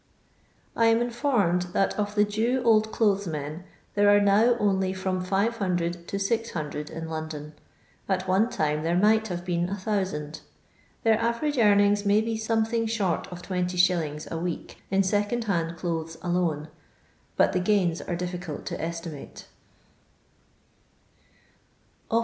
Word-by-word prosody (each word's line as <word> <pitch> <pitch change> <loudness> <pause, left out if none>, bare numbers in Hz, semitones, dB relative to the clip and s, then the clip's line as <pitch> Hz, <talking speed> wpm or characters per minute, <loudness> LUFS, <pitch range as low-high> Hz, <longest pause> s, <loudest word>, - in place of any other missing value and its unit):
I 230 - +4
am 225 0 +4
informed 230 - 0
that 195 - +2
of 205 0 -3
the 210 - +5
Jew 225 +5 0
Old 220 -1 +4
Clothes 200 -3 +1
Men 155 +2 -5 0.3
there 205 0 +4
are 205 0 +6
now 210 +4 +4
only 190 -3 +1
firom 185 -1 -2
500 185 -4 -1
to 200 - -3
600 195 -8 -2
in 165 0 -6
London; 155 -1 -6 0.6
at 190 -1 0
one 195 +5 +3
time 150 -7 0
there 170 +2 +1
might 220 +3 +4
have 175 -2 -5
been 175 -1 0
1000. 185 -6 -3 0.6
Their 220 -1 +4
average 245 +5 0
earnings 205 -1 +4
may 205 +1 +4
be 225 +1 -1
something 225 +1 0
short 200 -7 -1
of 180 -1 -9
20s. 180 -4 0
a 165 - -2
week 175 0 -5
in 195 +1 +3
second 205 +5 0
hand 170 -5 -1
clothes 165 -1 -3
alone; 170 -4 -1 0.7
but - - +4
the 185 - +2
gains 180 -3 +1
are 175 - -3
difficult 180 -2 -5
to - - -4
estimate. 165 -3 -6
190 Hz, 140 wpm, -26 LUFS, 170-215 Hz, 0.7 s, are